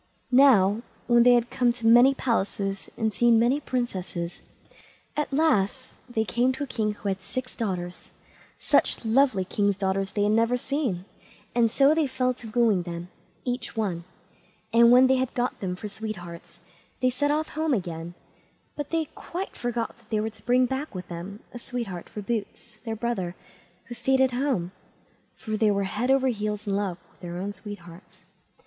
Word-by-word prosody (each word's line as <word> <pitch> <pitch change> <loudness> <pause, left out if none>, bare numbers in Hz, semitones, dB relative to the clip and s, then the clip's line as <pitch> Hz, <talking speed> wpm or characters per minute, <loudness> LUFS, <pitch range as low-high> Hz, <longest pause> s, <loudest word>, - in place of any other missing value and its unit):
Now, 230 -6 +6 0.2
when 240 -1 +5
they 245 +1 +7
had 240 -1 +3
been 245 -2 +2
to 235 -1 -8
many 240 +4 +7
palaces, 200 -5 -1
and 220 -1 0
seen 235 +2 +4
many 240 +5 +3
princesses, 190 -10 -3 0.7
at 300 -1 -1
last 265 -5 +1
they 225 -2 0
came 240 +6 +2
to 265 - -4
a - - -2
king 220 -5 -1
who 205 - -7
had 190 -1 -1
six 250 +7 -5
daughters; 180 -5 -4 0.5
such - - +2
lovely 225 -4 +3
king's 200 0 0
daughters 195 0 -1
they 205 - +1
had 205 - +3
never 230 +3 +3
seen, 250 - -2 0.5
and 235 -1 +3
so 275 +6 +4
they 315 -2 +2
fell 255 -1 0
to 235 -2 -10
wooing 220 -4 +3
them, 170 0 -6 0.4
each 245 -2 -3
one, 185 -6 -1 0.7
and 235 0 +7
when 250 +1 +8
they 260 0 +4
had 260 -1 -2
got 245 0 -1
them 180 -2 -3
for 210 +3 -6
sweethearts, 175 -6 -8 0.4
they 255 0 +2
set 290 +4 0
off 305 +1 0
home 315 -3 0
again, 175 -3 -5 0.6
but 290 -1 -5
they 325 -1 0
quite 370 +3 -6
forgot 240 -1 -3
that 230 -1 -25
they 215 - +1
were 220 +1 -2
to 220 - -20
bring 250 +1 +4
back 265 -1 -4
with 185 - -6
them 180 +5 -7
a 240 - -7
sweetheart 230 -9 -5
for 210 - -7
Boots, 225 +1 -4
their 225 -1 -2
brother, 210 -6 -2 0.5
who 235 - -8
stayed 265 +2 +1
at 265 -1 +4
home, 245 -9 -1 0.6
for 215 -2 -4
they 215 0 +3
were 200 -1 +1
over 195 - -2
head 240 +6 -1
and 260 -5 +2
ears 210 0 -2
in 200 -1 0
love 195 -4 -1
with - - -28
their 175 -1 -6
own 200 +3 -3
sweethearts. 185 -3 -11
225 Hz, 185 wpm, -26 LUFS, 195-255 Hz, 0.7 s, when